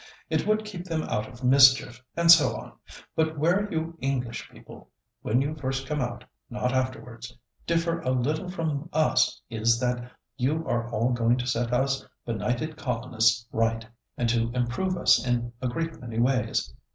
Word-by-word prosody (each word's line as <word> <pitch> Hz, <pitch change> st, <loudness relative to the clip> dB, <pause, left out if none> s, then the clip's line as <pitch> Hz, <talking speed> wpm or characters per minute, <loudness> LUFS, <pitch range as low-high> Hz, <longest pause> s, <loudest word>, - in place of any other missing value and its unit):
It -, -, 0 dB
would 215 Hz, 0 st, +1 dB
keep 185 Hz, -4 st, -7 dB
them 165 Hz, -3 st, -2 dB
out 105 Hz, -, -2 dB
of 125 Hz, 0 st, -13 dB
mischief, 130 Hz, -1 st, +5 dB
and 170 Hz, 0 st, +7 dB
so 170 Hz, -3 st, +6 dB
on. -, -, -8 dB, 0.4 s
But 160 Hz, 0 st, 0 dB
where 180 Hz, +7 st, +1 dB
you 165 Hz, +1 st, -3 dB
English 130 Hz, -3 st, -2 dB
people—when 125 Hz, +5 st, -5 dB
you 145 Hz, +2 st, -2 dB
first 135 Hz, -2 st, -3 dB
come 150 Hz, +1 st, -2 dB
out, 120 Hz, -1 st, -4 dB, 0.3 s
not 125 Hz, +1 st, -1 dB
afterwards—differ 130 Hz, +6 st, -3 dB
a 130 Hz, -, -3 dB
little 145 Hz, +8 st, 0 dB
from 160 Hz, -3 st, -3 dB
us 155 Hz, 0 st, +2 dB
is 115 Hz, +1 st, +2 dB
that 125 Hz, -1 st, -2 dB, 0.3 s
you 155 Hz, +6 st, 0 dB
are 120 Hz, 0 st, -1 dB
all 120 Hz, +2 st, 0 dB
going 120 Hz, 0 st, +2 dB
to 125 Hz, -, -3 dB
set 120 Hz, -1 st, -1 dB
us 135 Hz, +2 st, +1 dB, 0.2 s
benighted 125 Hz, +7 st, -2 dB
colonists 115 Hz, -3 st, +1 dB
right, 115 Hz, 0 st, 0 dB, 0.3 s
and 120 Hz, -, 0 dB
to 115 Hz, 0 st, +1 dB
improve 130 Hz, +10 st, -1 dB
us -, -, +4 dB
in 120 Hz, -1 st, -1 dB
a 130 Hz, -, 0 dB
great 165 Hz, +6 st, -3 dB
many 115 Hz, -2 st, -6 dB
ways. 125 Hz, +2 st, +1 dB
130 Hz, 165 wpm, -26 LUFS, 120-155 Hz, 0.4 s, and